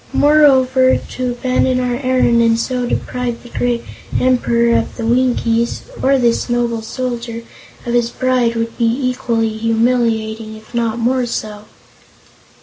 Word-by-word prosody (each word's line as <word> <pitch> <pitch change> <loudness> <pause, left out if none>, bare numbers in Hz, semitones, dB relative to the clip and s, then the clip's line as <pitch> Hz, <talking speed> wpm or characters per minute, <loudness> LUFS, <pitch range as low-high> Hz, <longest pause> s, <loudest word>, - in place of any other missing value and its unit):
Moreover, 265 -3 +4
to 255 -1 -4
abandon 255 +1 0
our 250 -1 -1
errand 255 -3 +2
and 230 0 +3
so 250 0 -2
deprive 245 -1 -3
the 240 - -12
great 240 -1 -1 0.4
Emperor 235 -2 +2
of - - -1
the 230 - -3
Winkies 235 -1 +1 0.2
or 275 +1 +3
this 240 -1 +1
noble 240 -1 0
Soldier 235 0 -5 0.4
of 240 - -2
his 240 -1 +2
bride, 250 -2 0
would 230 0 -3
be 230 -1 +3 0.2
equally 230 -3 -1
humiliating, 225 -1 0
if 215 +2 -16
not 230 -1 -1
more 245 +1 0
so." 210 -2 -5
240 Hz, 140 wpm, -17 LUFS, 230-255 Hz, 0.4 s, Moreover